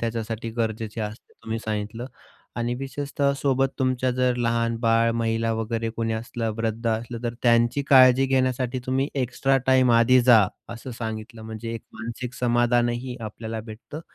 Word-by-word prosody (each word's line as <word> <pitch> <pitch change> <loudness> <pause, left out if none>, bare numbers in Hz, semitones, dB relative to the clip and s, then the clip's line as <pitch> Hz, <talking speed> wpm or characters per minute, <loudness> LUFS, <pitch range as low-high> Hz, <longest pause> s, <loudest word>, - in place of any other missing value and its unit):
त्याच्यासाठी 115 0 -3
गरजेचे 110 0 -3
असते 105 +1 -6
तुम्ही 115 0 -3
सांगितलं. 110 +3 -3 0.5
आणि 120 +1 -1
विशेषतः 140 +1 -1
सोबत 135 -1 +1
तुमच्या 130 -1 +1
जर 125 0 +1
लहान 115 -1 0
बाळ, 115 0 +3
महिला 115 0 0
वगैरे 115 0 -2
कोणी 115 0 -2
असलं, 115 0 -3
वृद्ध 115 +1 -2
असलं, 115 +1 -3
तर 120 0 -2
त्यांची 120 +3 +3
काळजी 130 0 +7
घेण्यासाठी 130 -1 0
तुम्ही 135 +2 0
एक्स्ट्रा 135 +1 +1
टाईम 130 -1 +5
आधी 120 +2 +5
जा, 115 -5 +6 0.2
असं 120 +2 -7
सांगितलं. 110 0 -6
म्हणजे 110 +1 -6
एक 115 - -6
मानसिक 115 +2 -6
समाधानही 120 +1 +1
आपल्याला 110 +1 -5
भेटतं. 125 +8 -9
115 Hz, 150 wpm, -24 LUFS, 115-130 Hz, 0.5 s, काळजी